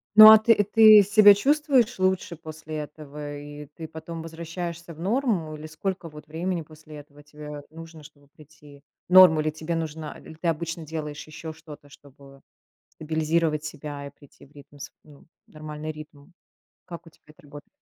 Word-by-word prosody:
Ну 215 0 +12
а 220 - +10
ты 220 -1 +3
ты 215 0 +7
себя 205 +1 +6
чувствуешь 265 +1 +1
лучше 185 -2 -1
после 155 -1 -10
этого, 150 -1 -8
и 145 0 -10
ты 160 - -8
потом 160 +1 -9
возвращаешься 170 +1 -7
в 155 - -17
норму? 195 - -1
Или 155 0 -10
сколько 180 +3 -5
вот 150 -1 -13
времени 170 +3 -3
после 155 0 -14
этого 145 0 -15
тебе 150 0 -10
нужно, 165 -1 -12
чтобы 145 -1 -18
прийти 150 -1 -18 0.3
норма 180 -4 +7
ли 155 0 -1
тебе 155 +2 -5
нужна? 160 -1 -5
Или 160 - -13
ты 160 +2 -5
обычно 165 0 -4
делаешь 150 -1 -7
еще 155 +1 -9
что-то, 150 -2 -14
чтобы 140 -1 -18 0.5
стабилизировать 155 0 -1
себя 150 -2 -8
и - - -9
прийти 145 0 -20
в 140 - -25
ритм 145 0 -17
св - - -9
ну, 145 -2 -18 0.2
нормальный 155 0 -8
ритм? 150 +1 -14 0.5
Как 170 -2 -10
у - - -14
тебя - - -31
это 150 0 -20
работает? 145 0 -13
155 Hz, 170 wpm, -24 LUFS, 150-170 Hz, 0.5 s, Ну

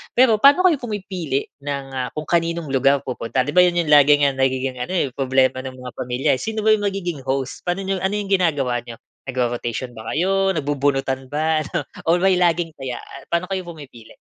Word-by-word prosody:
Pero 240 -3 +5
paano 285 +6 +7
kayo 335 - +4
pumipili 190 - -3 0.2
ng, 140 -1 -3
ah, 125 -1 -2
kung 155 -1 -6
kaninong 170 -2 0
lugar 135 +1 +3
pupunta 125 +1 -2
'di 145 - -4
ba 180 - +7
'yon 175 -1 +2
'yong 155 -3 0
laging 145 0 +6
nagiging 130 0 0
ano - - -7
eh 175 -6 +1
problema 130 -1 +1
ng 130 -1 -7
mga 125 -1 -9
pamilya? 125 +1 -2
Sino 220 +9 -4
ba - - +7
'yong 205 - -5
magiging 175 -8 -3
host, 135 0 -3
paano 175 +2 -1
'yong 190 -1 -2
ano 190 - +1
'yong 205 -1 -2
ginagawa 140 -10 +1
n'yo 115 -1 -10 0.3
nagro-rotation 125 -1 -2
ba 110 0 -5
kayo, 195 +3 +1
nagbubunutan 140 -3 -1
ba, 155 0 +1
ano? 170 -1 -2 0.2
Or 175 +2 +3
may 190 -1 +4
laging 170 -2 +1
taya, 130 -3 -5 0.2
paano 170 +2 -2
kayo 190 -2 -3
pumipili? 145 -9 -12
150 Hz, 195 wpm, -21 LUFS, 130-180 Hz, 0.3 s, paano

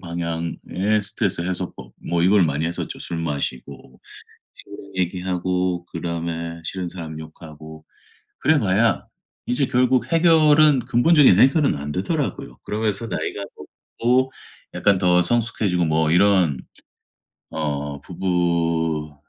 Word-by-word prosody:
방향의 85 +4 -2
스트레스 100 -3 -2
해소법 90 0 -5 0.2
뭐 85 0 +1
이걸 95 +1 +4
많이 75 0 -1
했었죠. 85 +1 -5
술 85 -1 -5
마시고 70 -4 -5 0.6
친구랑 100 -1 -12
얘기하고 90 -1 -1
그다음에 85 0 -5
싫은 90 +2 -4
사람 80 -3 -7
욕하고 80 0 -12 0.5
그래봐야 115 -7 +2 0.4
이제 125 +3 0
결국 125 0 +1
해결은 155 -4 +5
근본적인 125 - +4
해결은 135 - +4
안 75 +1 -5
되더라고요. 95 - -3
그러면서 110 +1 -2
나이가 100 -2 -4 0.6
먹고 130 +3 +2 0.4
약간 100 -2 +2
더 90 -1 +3
성숙해지고 105 -4 0
뭐 80 0 +1
이런 90 -5 +3 0.9
어 70 -2 -3
부분이 85 -4 -1
90 Hz, 275 characters per minute, -22 LUFS, 80-110 Hz, 0.9 s, 해결은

